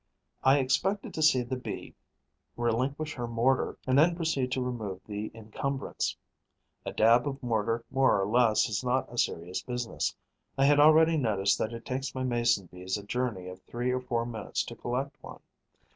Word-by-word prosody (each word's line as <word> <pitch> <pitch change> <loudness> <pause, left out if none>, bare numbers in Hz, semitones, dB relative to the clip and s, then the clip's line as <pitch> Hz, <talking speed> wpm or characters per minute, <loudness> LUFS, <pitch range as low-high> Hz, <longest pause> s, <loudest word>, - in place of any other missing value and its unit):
I 135 +2 +6
expected 190 +9 0
to 155 - -3
see 140 -5 +5
the 120 +2 -3
Bee 125 - -6 0.6
relinquish 130 +6 -1
her 120 -3 -4
mortar 120 +3 +1
and 130 +1 +3
then 170 +3 +5
proceed 160 -7 -1
to 130 - 0
remove 110 -7 -4
the 105 0 -4
encumbrance. 130 +5 -3 0.7
A - - -1
dab 115 +3 +4
of 135 -1 -5
mortar 115 0 0
more 135 -6 +3
or 95 - +1
less 115 0 +3
is 110 +1 -2
not 125 0 0
a - - -8
serious 85 +2 -1
business. 125 -2 -3 0.4
I 135 - +4
had 145 +1 +5
already 160 +2 +6
noticed 100 -7 +1
that 110 - -1
it 115 0 -8
takes 130 +1 -3
my 130 - -2
Mason 120 -5 +1
bees 90 +3 -4
a 100 - -8
journey 105 -4 -2
of 90 0 -9
three 120 +1 -2
or 130 0 -1
four 120 -2 -1
minutes 115 -3 -3
to - - -8
collect 135 +4 -3
one. - - -10
125 Hz, 180 wpm, -29 LUFS, 110-135 Hz, 0.7 s, I